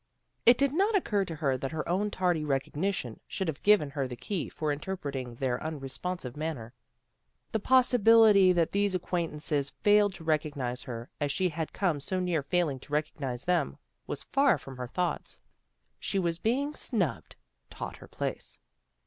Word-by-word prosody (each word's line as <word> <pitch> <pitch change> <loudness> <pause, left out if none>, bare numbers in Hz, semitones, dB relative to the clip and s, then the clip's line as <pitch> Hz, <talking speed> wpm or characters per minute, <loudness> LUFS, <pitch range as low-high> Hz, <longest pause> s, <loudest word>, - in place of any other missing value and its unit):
It 240 +1 +8
did 280 -1 +2
not 400 +6 +2
occur 205 - +1
to 165 - -6
her 135 -4 0
that 135 - -3
her 155 - -3
own 195 +4 +1
tardy 180 -5 0
recognition 145 - -2
should 190 -2 -3
have 155 -3 -3
given 205 -9 +4
her 140 -2 -2
the 125 - -6
key 185 - -4
for 155 -1 -2
interpreting 140 -6 -4
their 125 0 -1
unresponsive 150 -1 -4
manner. 150 -7 -4 0.8
The 220 - 0
possibility 225 -5 +6
that 170 -2 +2
these 200 -1 +1
acquaintances 155 -5 -1
failed 205 +1 +3
to 170 - -10
recognize 145 -6 -1
her, 120 -1 -7
as 145 -1 +1
she 185 +5 +1
had 160 -1 -4
come 175 -7 0
so 185 +6 -2
near 175 -4 0
failing 145 -2 0
to 145 - -12
recognize 140 -5 -2
them, 170 - +1 0.3
was - - -4
far 275 - +3
from 135 -1 -10
her 125 -1 -4
thoughts. 175 +4 -3 0.6
She - - -1
was 170 -3 0
being 275 +6 0
snubbed, 195 - -1 0.3
taught - - -7
her - - -13
place. - - -4
165 Hz, 165 wpm, -29 LUFS, 140-195 Hz, 0.8 s, It